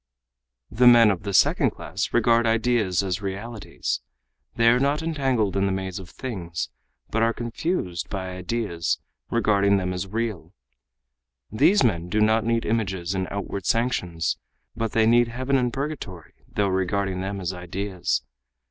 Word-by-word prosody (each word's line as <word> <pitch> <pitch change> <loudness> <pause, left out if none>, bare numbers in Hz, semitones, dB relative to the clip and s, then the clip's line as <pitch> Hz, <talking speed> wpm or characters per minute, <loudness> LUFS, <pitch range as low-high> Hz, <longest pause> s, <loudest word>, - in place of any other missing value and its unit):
"The 120 +3 +4
men 115 -3 +8
of 95 - -3
the 100 - -4
second 95 - +4
class - - -4
regard 115 0 +3
ideas 110 -5 +2
as 95 0 -2
realities. 105 +3 -4 0.5
They 115 0 +3
are 120 +1 +4
not 140 +4 +1
entangled 135 - 0
in 100 0 +2
the - - 0
maze 95 0 -3
of 90 -2 -10
things, 90 -9 -5 0.4
but 115 - +1
are 115 0 +3
confused 120 - -3
by 95 -1 -4
ideas, 90 -3 -2 0.3
regarding 100 -3 +3
them 90 -1 -1
as 90 +1 -4
real. 110 -2 -3 1.0
These 180 - +4
men 90 -7 +1
do 105 +3 +1
not 110 +1 +3
need 115 0 0
images 95 -5 -1
and 95 -1 -1
outward 100 -1 -4
sanctions, 90 -8 0 0.4
but 115 -1 -2
they 110 -1 +4
need 120 +1 +5
heaven 130 +4 -1
and 125 -2 +2
purgatory 135 - -5 0.2
though 100 -1 +1
regarding 95 0 0
them 100 +1 -3
as 90 0 -3
ideas. 90 +1 -2
105 Hz, 155 wpm, -24 LUFS, 95-115 Hz, 1.0 s, men